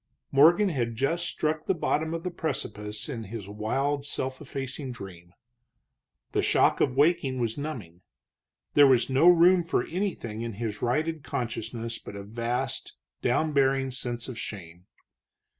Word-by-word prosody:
Morgan 170 +9 +6
had 120 -8 -1
just 165 +8 0
struck 155 0 -2
the 190 - +2
bottom 160 -1 0
of 165 - -5
the 180 - -3
precipice 110 -10 -4
in 115 -6 -5
his 105 -1 -7
wild, 135 +8 -1
self 130 -1 -4
effacing 135 -1 -5
dream. 90 -6 -10 1.0
The - - +1
shock - - +3
of 130 - +2
waking 145 -3 +2
was 115 -2 -1
numbing; 120 - -6 0.7
there 145 -1 +8
was 130 0 +3
no 145 +7 +6
room 175 +1 +6
for 170 - 0
anything 165 - -3
in 115 -1 -4
his 105 0 -4
righted 155 +6 0
consciousness 115 -2 -4
but - - -10
a 100 - -6
vast, 115 +4 -3 0.3
down 155 -1 +1
bearing 135 -1 +2
sense 120 -2 -3
of 125 -4 -6
shame. 90 -3 -7
130 Hz, 150 wpm, -27 LUFS, 115-155 Hz, 1.0 s, there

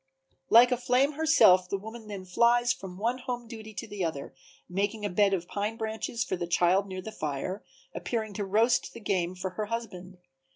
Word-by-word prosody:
Like 240 +2 +7
a 250 - +2
flame 250 +3 +2
herself 285 - +5
the 195 - -1
woman 220 +2 -10
then 200 -3 -7
flies 240 +6 +3
from 190 -7 -9
one 235 +5 -1
home 245 -2 -5
duty 220 -1 -9
to 230 - -5
the 205 -3 -4
other, 160 -4 -4 0.3
making 205 +3 -2
a 205 - -2
bed 200 +2 +3
of 175 -3 -1
pine 210 +2 -3
branches 220 +1 -3
for 185 - -2
the 175 -1 -4
child 180 +3 +3
near 185 -1 -6
the 220 - -6
fire, 155 +2 -4 0.3
appearing 220 -3 -3
to 205 - -3
roast 220 +5 +2
the - - -7
game 185 -4 -1
for 185 +1 -4
her 215 +3 -3
husband. 190 -5 -6
210 Hz, 200 wpm, -28 LUFS, 185-235 Hz, 0.3 s, Like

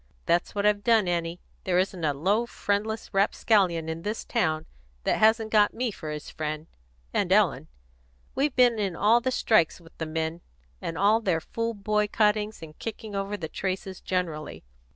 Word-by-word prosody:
That's 175 +4 +1
what 200 0 0
I've 205 -1 +3
done, 225 -4 +4
Annie. 170 0 -1 0.2
There 180 -1 +1
isn't 185 -2 0
any 145 -3 0
low, 205 +10 +1
friendless 215 +1 -2
rapscallion 195 -4 +2
in 160 +1 -4
this 210 +4 -4
town 160 -9 0 0.4
that - - +1
hasn't 220 0 +4
got 210 -1 +4
me 245 -1 -1
for 155 -5 -7
his 150 0 -6
friend 155 0 -4 0.5
and - - 0
Ellen. - - +3 0.7
We've 280 0 0
been 245 -3 +4
in 195 -4 -1
all 225 +6 +4
the 260 - 0
strikes 215 -10 +2
with 165 -1 -18
the 160 - -2
men, 160 +1 -3 0.4
and 165 - -4
all 210 +3 +4
their 185 -7 +1
fool 230 +7 -3
boycottings 210 0 +1
and 155 -1 -12
kicking 220 -1 -6
over 195 +1 -2
the 165 -4 -5
traces 190 +2 -4
generally. 155 - -3
195 Hz, 175 wpm, -27 LUFS, 165-220 Hz, 0.7 s, done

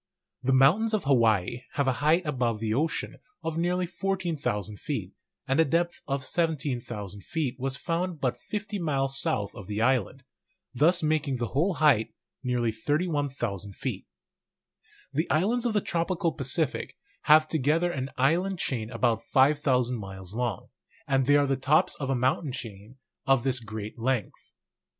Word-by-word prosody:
The 130 - +1
mountains 170 +13 +4
of 210 - -2
Hawaii 115 -4 +2
have 140 -1 0
a - - +4
height 165 +4 +3
above 125 -7 0
the 110 -1 -1
ocean 155 +7 -1 0.3
of 165 -1 -2
nearly 180 +2 0
14,000 170 - -2
feet, - - -4 0.3
and 135 +3 +1
a - - +7
depth 170 +3 0
of 135 -2 -2
17,000 125 - -2
feet 145 - -2
was 135 +1 -1
found 170 0 -2
but 125 -3 0
50 210 -1 -5
miles 135 -4 0
south 110 -12 -1
of 100 - -10
the 105 0 -3
island, 130 +2 +1 0.5
thus 165 +7 +3
making 155 -3 +1
the 120 -1 -2
whole 170 +7 +1
height 140 -7 +3 0.3
nearly 125 -3 0
31,000 135 - -2
feet. - - -4 1.1
The 155 +4 0
islands 225 +10 +2
of 230 - -1
the 210 - +2
tropical 170 0 0
Pacific 140 +2 -2 0.3
make 155 +1 +7
together 160 +4 +1
an 135 -4 -3
island 175 +8 +2
chain 115 -9 -2
about 115 -1 +1
5,000 130 -1 +2
miles 95 -2 -8
long; 120 -5 -3 0.4
and 135 -2 +2
they 145 0 +6
are 145 - +3
the 135 -1 +1
tops 140 +4 +3
of 135 -2 -3
a 135 - +2
mountain 130 +3 0
chain 115 -4 -8 0.3
of 135 -3 +4
this 130 -2 +1
great 110 -1 -7
length. 120 -2 -2
135 Hz, 155 wpm, -27 LUFS, 120-160 Hz, 1.1 s, a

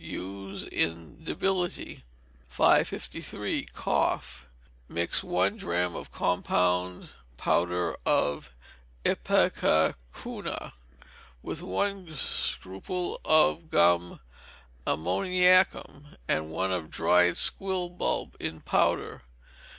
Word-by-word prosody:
Use 95 +1 -6
in 85 - -2
debility. 180 - -2 0.4
553. - - 0
Cough. 60 0 -2 0.4
Mix 85 0 0
one - - 0
drachm 90 0 -1
of - - -8
compound 90 0 0 0.3
powder 90 +2 0
of 70 -3 0 0.5
ipecacuanha 65 -6 0 0.7
with - - -4
one 185 - -2
scruple 135 - -2
of 155 +1 +3
gum 85 - +3 0.7
ammoniacum 150 - +2
and 80 0 0
one 95 +4 -1
of 85 -4 -3
dried 90 0 +3
squill 190 -2 +2
bulb 175 0 -2
in 80 0 -2
powder. - - 0
90 Hz, 80 wpm, -28 LUFS, -, 0.7 s, of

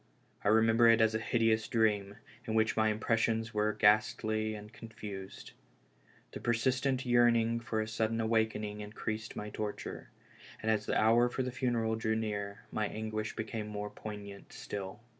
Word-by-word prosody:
I - - -1
remember 110 +2 +5
it 115 0 +6
as 110 0 +4
a 110 - 0
hideous 115 -1 +1
dream, 105 -4 +1 0.3
in 110 - -1
which 110 0 +2
my 110 0 +3
impressions 115 +1 0
were 105 0 +2
ghastly 110 +1 +2
and 105 +1 -10
con 115 - -10
fused, 100 -3 -8 0.8
The - - -7
persistent 130 +3 +1
yearning 120 -1 +3
for 115 -2 -2
a 110 - -3
sudden 110 +1 -1
awakening 110 -2 0
increased 110 +1 -5
my 105 0 -5
torture; 105 -1 -5 0.5
and 110 - 0
as 110 -1 0
the - - +2
hour 115 +3 +4
for 130 - -2
the 125 - -3
funeral 120 -3 0
drew 110 0 0
nearer, 105 -2 -3
my 110 -1 0
anguish 110 0 -4
became 110 -1 -4
more 105 0 -5
poignant 105 -2 -9
still. 100 +1 -6
110 Hz, 160 wpm, -32 LUFS, 105-115 Hz, 0.8 s, it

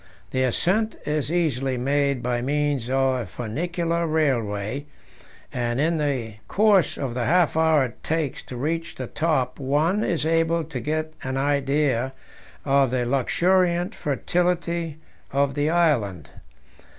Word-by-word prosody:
The 130 - 0
ascent 195 - +1
is 150 0 -1
easily 135 -7 0
made 140 0 +1
by 120 0 0
means 145 -2 0
of 135 0 +2
a 120 - -3
funicular 165 - -2
railway, 130 -4 0 0.7
and 120 0 -1
in 160 +2 +1
the 125 -8 -2
course 205 -5 +3
of 135 -4 -3
the 120 -1 -1
half 175 -2 +3
hour 160 -3 +4
it 120 - -10
takes 160 -4 -1
to 125 - -7
reach 165 +5 -2
the 130 - -5
top 135 -3 -1
one 155 +10 +1
is 165 -3 0
able 165 +1 +2
to 150 -4 -6
get 155 +5 -2
an 130 0 -3
idea 140 -2 +1 0.5
of 135 -2 +3
the 125 0 0
luxuriant 175 +7 +2
fertility 170 +1 -1 0.3
of 140 0 +1
the 145 +2 0
island. 115 - +1
145 Hz, 140 wpm, -24 LUFS, 130-165 Hz, 0.7 s, hour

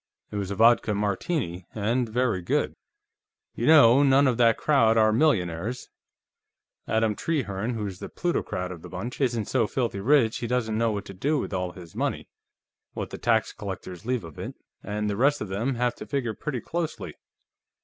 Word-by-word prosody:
It 105 - -4
was 100 -2 -3
a 100 - -3
vodka 115 0 +4
Martini, 100 - -2
and 115 +3 0
very 115 -4 0
good. 85 - 0 0.8
"You 120 - -2
know, 140 -5 +7
none 140 0 +5
of 125 -4 +2
that 115 -2 +4
crowd 115 -7 +3
are 110 -1 +4
millionaires. 110 - 0 1.0
Adam 110 0 +2
Trehearne, 115 -7 -2
who's 100 -4 -4
the - - -7
plutocrat 90 - -2
of 85 -3 -8
the - - -10
bunch, 115 +10 -6
isn't 120 -5 +1
so 115 -1 +1
filthy 120 -5 -2
rich 120 0 +3
he 120 - -3
doesn't 115 -3 0
know 115 -1 +2
what 100 -1 -4
to - - -9
do 140 +11 0
with 130 - -3
all 90 -1 -2
his 85 -3 -12
money - - -2 0.7
what - - -5
the - - -7
tax 115 -2 +1
collectors 95 -3 -7
leave 125 -1 -1
of 80 -3 -11
it - - -6 0.3
and 105 +1 -3
the 100 - -1
rest 140 +7 +3
of 105 - -5
them 115 +8 -1
have 120 0 0
to - - -8
figure 130 -6 -1
pretty 130 +1 -4
closely. 170 -2 -4
115 Hz, 185 wpm, -26 LUFS, 100-125 Hz, 1.0 s, know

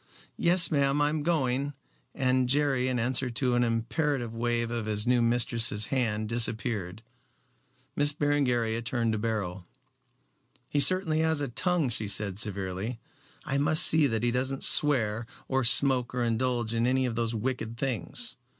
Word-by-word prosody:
Yes, 170 0 +3
ma'am, 140 -1 +1
I'm 150 +1 0
going," 140 -3 -1 0.4
and 130 -1 0
Jerry 135 -2 +1
in 130 -1 -1
answer 125 +2 0
to 125 +1 0
an 120 0 +2
imperative 120 +2 -2
wave 115 0 -2
of 115 -2 -4
his 105 0 0
new 125 0 +2
mistress's 115 -2 0
hand 110 -5 -1
disappeared. 110 -3 -1 0.9
Miss 145 0 +2
Berengaria 125 -6 -1
turned 120 -1 -2
to 110 - -2
Beryl. 100 -5 -4 1.0
"He 145 - -1
certainly 160 +1 +5
has 160 -1 +1
a - - -2
long 140 - -5
tongue," 180 -5 0
she 110 -2 -4
said 100 -1 -1
severely. 100 +2 -4 0.5
"I 140 - -1
must 150 +2 +4
see 155 -2 +4
that 115 -3 -2
he 120 - +1
doesn't 130 +2 -1
swear 115 -6 +4 0.2
or 135 0 0
smoke 125 0 +4
or 125 - -1
indulge 120 0 -1
in 115 +1 0
any 130 +1 +1
of 120 - -3
those 115 0 -2
wicked 115 0 -4
things. 115 -9 -4
120 Hz, 160 wpm, -27 LUFS, 115-140 Hz, 1.0 s, certainly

